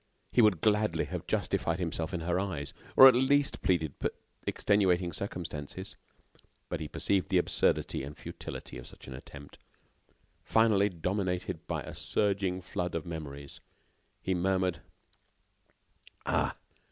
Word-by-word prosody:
He 125 - +5
would 105 -8 +4
gladly 105 0 +2
have - - -5
justified 85 0 0
himself 85 -1 -2
in 90 -3 -3
her 90 +2 0
eyes, 75 -8 -3 0.2
or 135 - +12
at 130 - +8
least 135 +3 +2
pleaded 80 -6 +1 0.5
extenuating 95 -4 +2
circumstances, 85 -6 -5 0.7
but 90 - -2
he 80 - -4
perceived 95 +2 0
the - - +3
absurdity - - +1
and 70 +2 -7
futility - - -7
of - - -10
such - - -13
an 65 - -7
attempt. 70 +2 -11 0.8
Finally, 105 -3 +4
dominated 90 +1 -2
by - - -2
a - - -8
surging 95 -3 0
flood 90 -1 -3
of 80 - -2
memories, 70 -4 -7 0.6
he 95 - +1
murmured: 95 0 +1 1.4
"Ah! - - +1
90 Hz, 130 wpm, -31 LUFS, 80-100 Hz, 1.4 s, or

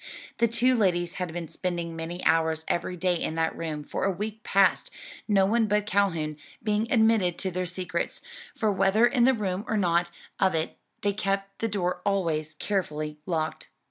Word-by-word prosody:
The 235 - +5
two 240 +3 +3
ladies 175 -5 +1
had 180 -2 -2
been 170 0 -5
spending 170 -1 -3
many 165 +2 -5
hours 160 0 +2
every 180 +1 -1
day 180 +1 +2
in 160 - -1
that 160 0 0
room 155 -3 -4
for - - -4
a 195 - +3
week 210 +4 -5
past, 195 -4 +3 0.4
no 195 -3 +4
one 225 +2 +2
but 210 0 +1
Calhoun 170 -7 0 0.3
being 215 +1 0
admitted 220 -7 +3
to 190 - -2
their 180 +1 -2
secrets, 180 -1 -3 0.3
for 215 -2 +2
whether 195 +4 +4
in 240 -1 +3
the 265 0 +5
room 195 -3 -2
or 215 - 0
out 175 0 +2 0.3
of 190 -3 +3
it 160 0 -1 0.3
they 205 0 +1
kept 195 -1 -2
the 225 - 0
door 180 -4 -1
always 165 -6 0
carefully 155 -5 -2
locked. 160 -3 -2
185 Hz, 180 wpm, -27 LUFS, 165-210 Hz, 0.4 s, The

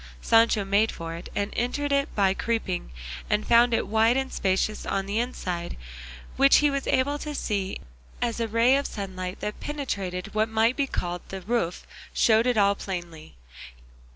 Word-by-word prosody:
Sancho 225 - +4
made 200 +3 +2
for 165 0 -6
it, 170 - -8
and 200 +1 -2
entered 285 +4 -1
it 280 0 +2
by 195 -2 +3
creeping, 210 -4 -2 0.4
and 210 0 +1
found 240 +1 +5
it 230 - +1
wide 225 +4 +3
and 265 0 -2
spacious 195 +2 0
on 195 0 -1
the 205 +3 -1
inside, 180 -8 -3 0.6
which 275 +1 +6
he 295 -1 +4
was 275 -1 -2
able 285 +3 +1
to 300 0 -5
see 200 -6 -2 0.4
as 235 -1 -1
a 230 - 0
ray 230 +4 +4
of 280 - -1
sunlight 185 -3 -6
that 210 - -4
penetrated 200 -11 -4
what 215 +1 +1
might 225 +2 +2
be 280 -2 0
called 175 -7 -3
the 190 0 -6
roof 190 -3 -2 0.3
showed 225 +1 +4
it 245 -2 +2
all 200 -1 +5
plainly. 175 - -7
220 Hz, 175 wpm, -26 LUFS, 190-245 Hz, 0.6 s, which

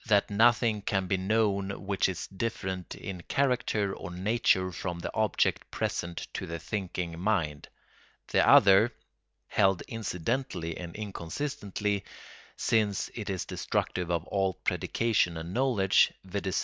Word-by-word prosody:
that 105 -3 +3
nothing 110 0 +3
can 95 -1 0
be 95 - +1
known 100 0 +1 0.2
which 100 -1 +1
is 90 - -4
different 95 -3 -4
in 95 -3 -6
character 120 -7 +1
or 85 - -7
nature 95 -1 +2
from 90 0 -4
the 85 - -4
object 110 -3 +1
present 85 0 -3
to - - -3
the 85 0 -4
thinking 90 -3 -4
mind; 85 -8 0 0.6
the - - +4
other, 100 +4 +7 0.6
held 95 -3 +2
incidentally 95 -4 -2
and 85 -2 -7
inconsistently, 105 - -3 0.5
since 105 -4 +1
it 110 -3 -5
is 95 -2 -2
destructive 90 -2 -2
of 85 -2 0
all 95 -2 0
predication 110 -7 +1
and 80 +2 -6
knowledge, 120 -7 +3
viz. 95 0 -2
95 Hz, 130 wpm, -29 LUFS, 90-110 Hz, 0.6 s, other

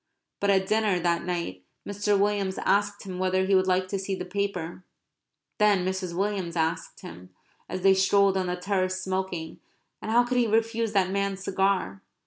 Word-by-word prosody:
But 200 - 0
at 190 -1 +3
dinner 215 -2 +2
that 170 -1 0
night 170 - -3 0.2
Mr. 205 0 +1
Williams 200 -1 0
asked 205 0 +1
him 185 -2 -6
whether 185 0 +1
he 195 - +1
would 185 0 +4
like 185 0 +1
to 195 - -2
see 195 0 -3
the 180 - -5
paper; 180 -3 -3 0.8
then 205 -3 +3
Mrs. 185 -2 -3
Williams 195 -4 -1
asked 160 0 -2
him 90 +2 -11 0.4
(as 185 - -4
they 195 +1 +6
strolled 195 0 +3
on 185 -1 0
the 180 - -1
terrace 185 0 -1
smoking 185 -4 -3 0.4
and - - -5
how 235 +2 +5
could 250 +1 0
he 240 - +2
refuse 225 0 0
that 190 -2 +2
man's 200 0 -2
cigar?) 190 - 0
190 Hz, 180 wpm, -26 LUFS, 180-200 Hz, 0.8 s, they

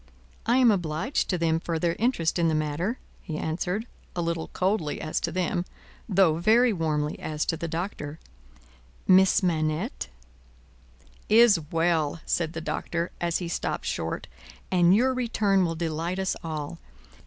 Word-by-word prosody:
"I 240 +2 +4
am 250 -3 +6
obliged 175 - -1
to 180 - +1
them 165 -1 +1
for 165 0 -2
their 170 +1 0
interest 200 -8 +1
in 170 - +3
the 160 - +2
matter," 155 - -1 0.2
he 155 - -5
answered, 180 +8 -2 0.3
a 175 - -1
little 165 -1 -2
coldly 185 -5 -1
as 155 - -2
to 170 - -2
them, 175 0 0 0.5
though 185 -5 +4
very 225 +7 +4
warmly 150 -4 -1
as 155 -1 -2
to - - 0
the 170 +1 -4
Doctor. 165 -3 -4 0.9
"Miss 190 +1 +5
Manette 160 - -1 0.7
" 65 0 -29 0.2
"Is 205 -7 +4
well," 165 -2 +1
said 165 -2 0
the 160 - -4
Doctor, 170 +2 -3
as 170 -1 +1
he 175 - -4
stopped 170 - -3
short, - - -3 0.5
"and 180 0 +5
your 260 +4 +3
return 215 -6 +2
will 165 -1 -2
delight 165 +2 -2
us 190 -1 0
all. 160 0 -5
170 Hz, 155 wpm, -26 LUFS, 160-190 Hz, 0.9 s, am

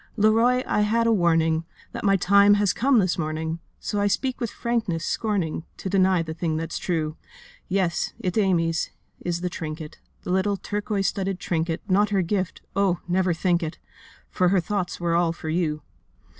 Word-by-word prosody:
'Leroy, 230 +4 +4
I 210 - +1
had 225 +2 +2
a 230 - +4
warning, 165 -4 +2 0.3
That - - -6
my 195 -1 +4
time 200 +2 +5
has 205 -2 +2
come 265 +1 +3
this 185 -4 +2
morning, 160 +1 -2 0.2
So 205 - -2
I 205 - +3
speak 255 +6 -1
with 235 - -1
frankness, 220 -10 -2
scorning 190 -8 -1
To 190 - -5
deny 185 -3 +3
the 160 -1 -5
thing 160 -1 -2
that's 165 0 -3
true. 155 -3 -2 0.5
Yes, 185 -3 0
it's 180 -1 -2
Amy's, 170 -6 +1 0.3
is 175 -1 -3
the 180 - -1
trinket, 155 -1 -6 0.3
Little 190 +2 +1
turquoise 205 +1 -2
studded 195 -2 -3
trinket, 165 -2 -2
Not 205 +2 +3
her 195 -3 +2
gift—oh, 190 0 -1
never 180 +1 +2
think 175 +1 +1
it! 160 -1 -4 0.5
For 180 -1 +2
her 195 0 +3
thoughts 180 +1 -2
were 170 -1 0
all 170 -1 +2
for 160 -1 -7
you. 155 -2 -1
185 Hz, 170 wpm, -24 LUFS, 165-205 Hz, 0.5 s, time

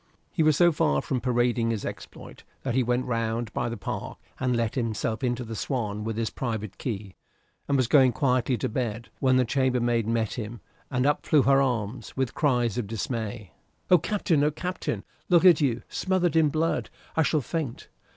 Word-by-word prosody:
He 165 - -1
was 155 -2 +4
so 175 -1 +6
far 75 - +2
from 130 -2 -2
parading 120 -2 +1
his 110 -3 -2
exploit - - -8 0.2
that 130 - -1
he 130 - +3
went 125 +1 0
round 115 -1 -2
by - - -1
the 115 - -5
park 95 - -5 0.2
and 125 -1 +1
let 115 -2 0
himself 115 -1 -2
into 125 0 0
the 115 -1 -6
"Swan" 105 -5 -2
with 110 0 -3
his 115 -1 -1
private 110 -5 -4
key, 105 -6 -4 0.5
and 140 - +2
was 130 - +3
going 130 +1 +5
quietly 125 0 +1
to - - -1
bed, 115 -1 -3
when 130 -2 +3
the 130 - +3
chambermaid 120 -3 +1
met 115 -2 0
him, 115 0 -6 0.3
and 125 -1 0
up 145 +1 +2
flew 150 -4 +4
her 135 0 +5
arms, 120 -3 -2
with 130 -2 0
cries 125 -6 +1
of 110 - -3
dismay. 110 -2 -4 0.4
"Oh, 180 - +8
Captain! 160 -6 +1
Captain! 180 +3 -3 0.3
Look 175 0 +5
at 175 -4 +7
you 125 -4 +1
smothered 185 -4 0
in 160 -2 +5
blood! 160 +3 0 0.3
I 160 - +3
shall 155 -1 +2
faint." 140 -1 -4
125 Hz, 190 wpm, -26 LUFS, 115-140 Hz, 0.5 s, Oh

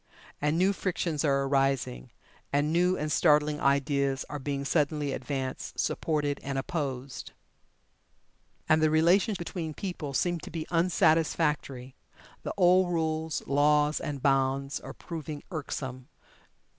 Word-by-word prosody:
And 150 +2 +1
new 190 +3 +3
frictions 170 -5 -2
are 140 -2 +2
arising, 135 - 0 0.4
and 145 +2 +1
new 180 +2 +3
and 150 +1 -2
startling 150 -2 +3
ideas 140 -1 +1
are 145 - -4
being 140 0 -3
suddenly 150 -1 0
advanced, 135 -2 -4
supported 150 -3 0
and 140 0 -4
opposed. 135 -3 -4 1.3
And 155 0 +4
the 155 - +4
relations 180 +7 +3
between 165 -3 -5
people 160 -8 -5
seem 175 +2 +1
to - - -9
be 160 -1 -4
unsatisfactory. 160 -6 +1 0.5
The - - -4
old 180 -1 +4
rules, 160 -1 -1
laws, 150 +1 +3
and 145 -4 -5
bonds 135 0 +1
are - - -9
proving 155 -3 -7
irksome. 130 -5 -5
150 Hz, 125 wpm, -28 LUFS, 140-165 Hz, 1.3 s, And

